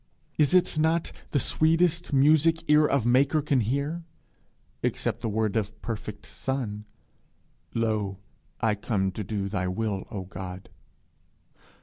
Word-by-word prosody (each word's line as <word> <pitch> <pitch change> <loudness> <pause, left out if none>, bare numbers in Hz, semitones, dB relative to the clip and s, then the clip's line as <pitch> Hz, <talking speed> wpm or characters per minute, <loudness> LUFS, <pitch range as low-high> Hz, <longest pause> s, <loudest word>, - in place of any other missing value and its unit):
Is 150 +4 +4
it 175 -3 +3
not 160 +2 +1 0.2
the 145 - +1
sweetest 165 +5 +2
music 155 +4 +4
ear 150 0 +5
of 140 -5 +1
maker 135 +5 +4
can 140 -2 +1
hear? 140 +9 -1 0.8
except - - -1
the 115 - -1
word 110 0 0
of 105 -2 -2
perfect 105 -2 -5
son, 115 -6 -4 0.9
'Lo, 110 -4 0 0.4
I 110 -1 +2
come 100 -2 -1
to 105 - -5
do 100 0 -3
thy 95 -2 -2
will, 100 +1 -2
O 100 -3 -5
God!' 95 0 -8
115 Hz, 130 wpm, -27 LUFS, 105-150 Hz, 0.9 s, ear